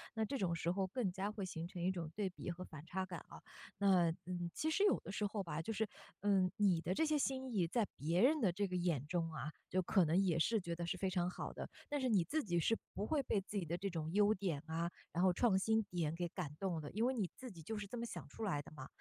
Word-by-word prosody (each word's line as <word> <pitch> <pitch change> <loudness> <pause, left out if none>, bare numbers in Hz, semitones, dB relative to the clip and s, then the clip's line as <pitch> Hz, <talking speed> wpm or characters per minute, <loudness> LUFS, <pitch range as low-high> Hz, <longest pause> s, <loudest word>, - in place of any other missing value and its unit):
那 220 - +1
这 275 +5 -2
种 180 -4 +1
时 165 +1 -1
候 195 +1 +1
更 195 -2 -1
加 195 +3 -2
会 205 -3 -3
形 165 -2 -4
成 180 -1 -7
一 185 - +2
种 170 -4 -4
对 205 -2 -1
比 180 - -6
和 175 +2 -6
反 155 -1 -10
差 190 +2 -2
感 175 -3 -6
啊。 - - -10 0.4
那， 185 -4 +5
嗯， 175 -1 -3
其 315 - 0
实 395 +6 +3
有 410 - +5
的 - - -7
时 205 +1 0
候 205 0 -1
吧， 165 -2 -3
就 225 - -3
是， 220 0 0 0.3
嗯， 195 -3 +3
你 190 -6 +4
的 180 +3 0
这 320 - +2
些 305 -1 +2
新 265 -3 -1
意 185 -5 +3
在 220 +4 +1
别 165 +6 +1
人 295 +4 +5
的 195 - +4
这 200 +3 0
个 185 - -3
眼 170 -6 +1
中 165 -1 0
啊， 155 0 -4 0.2
就 185 +1 +2
可 185 -1 +4
能 160 +3 +3
也 180 -4 +3
是 220 +6 +3
觉 170 -2 -3
得 170 0 -3
是 185 - -1
非 190 - 0
常 180 -1 +1
好 - - -5
的。 - - -6 0.2
但 290 -1 0
是 255 - +2
你 195 -6 +5
自 305 - 0
己 175 -3 +1
是 225 - +3 0.2
不 205 - -2
会 300 +1 +2
被 210 - +1
自 205 +2 -9
己 195 - 0
的 170 +3 -2
这 195 +2 -2
种 160 -2 -3
优 205 +2 +5
点 180 -8 -1
啊， 165 +2 -1 0.2
然 175 - +1
后 185 - +6
创 215 -1 +4
新 220 +2 +3
点 165 -4 -1
给 175 0 -1
感 165 -4 -4
动 180 -5 -1
的， 145 - -6
因 220 +3 +1
为 260 - +3
你 205 -8 0
自 255 -3 -7
己 170 - -10
就 215 +7 -4
是 210 - -3
这 245 - -6
么 235 - -2
想 - - -6
出 225 - -7
来 180 -9 +1
的 140 - -13
嘛。 135 -4 -8
185 Hz, 310 characters per minute, -38 LUFS, 170-215 Hz, 0.4 s, 后